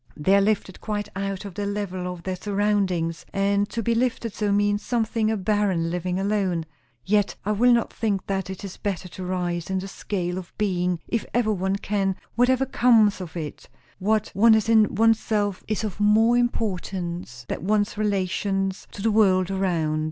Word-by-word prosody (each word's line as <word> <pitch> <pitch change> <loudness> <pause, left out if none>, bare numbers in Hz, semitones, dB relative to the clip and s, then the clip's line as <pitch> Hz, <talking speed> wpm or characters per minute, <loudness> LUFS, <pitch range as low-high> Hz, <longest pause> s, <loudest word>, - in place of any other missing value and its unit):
They 190 +6 +3
are 200 - +5
lifted 200 -2 -1
quite 210 -1 -3
out 195 0 -3
of 200 - -7
the 200 +2 -3
level 185 -3 -3
of 175 -2 -9
their 185 +1 -2
surroundings; 195 -5 0
and 200 +1 +1
to 230 - -3
be 235 - +1
lifted 230 -2 -1
so, 210 -1 -1
means 205 0 +2
sometimes 225 -2 0
a 220 - 0
barren 195 -4 +1
living 180 +1 -2
alone. 195 -4 0 0.4
Yet 205 0 +2
I 210 - +1
will 240 +4 +4
not 235 -1 +2
think 205 -4 -1
that; 195 -1 -2
it 190 +2 -7
is 190 - -8
better 190 -3 -3
to 185 - -8
rise 180 -2 -2
in 190 - 0
the 190 +1 -3
scale 185 -2 -3
of 185 - -11
being, 180 -4 0
if 230 - -1
ever 225 -3 +2
one 190 0 -1
can, 200 -1 -1 0.2
whatever 255 +3 +3
comes 225 -6 +4
of 175 -1 -7
it; 155 -3 -7 0.3
what 215 +2 +1
one 220 +3 +6
is 220 +1 +1
in 220 -2 +4
oneself 215 -2 +2
is 215 0 -1
of 210 -2 -4
more 220 +3 +4
importance 180 - -2
than 180 - -4
one's 210 +1 +1
relations 195 -1 -1
to 200 - -7
the 225 - +3
world 190 -3 +3
around. 170 -5 0
200 Hz, 185 wpm, -24 LUFS, 185-215 Hz, 0.4 s, one